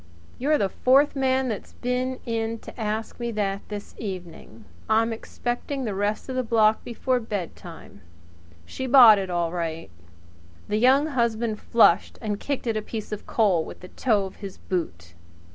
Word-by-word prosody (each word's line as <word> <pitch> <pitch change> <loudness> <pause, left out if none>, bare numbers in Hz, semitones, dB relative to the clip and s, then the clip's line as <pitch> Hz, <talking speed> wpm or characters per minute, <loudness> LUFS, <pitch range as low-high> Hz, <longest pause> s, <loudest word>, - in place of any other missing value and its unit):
"You're 295 +4 +2
the 200 - +1
fourth 270 +9 +3
man 265 -1 +1
that's 220 -4 -5
been 255 +1 -2
in 230 -1 -2
to - - -11
ask 215 +2 -3
me 235 -1 -2
that 200 -2 -1
this 205 -1 -7
evening. 175 - -8 0.2
I'm 225 +1 +3
expecting 245 +4 -4
the 210 - -2
rest 205 +2 -2
of 260 - -4
the 255 - +1
block 220 -2 +3
before 250 +2 -1
bedtime. 180 - -7 0.6
She's 260 - -5
bought 240 -6 +9
it 190 -1 -4
all 170 -2 -1
right." 165 - -4 0.8
The 210 - 0
Young 265 +5 +5
Husband 235 -6 -1
flushed 225 -7 +3
and 210 -3 -3
kicked 280 -3 -3
at 225 -2 0
a 215 - -1
piece 215 0 -6
of 210 - -6
coal 195 -8 +2
with - - -10
the 180 - -11
toe 215 -6 +1
of 190 - -10
his 195 -2 -8
boot. 85 - -4
220 Hz, 170 wpm, -25 LUFS, 195-250 Hz, 0.8 s, bought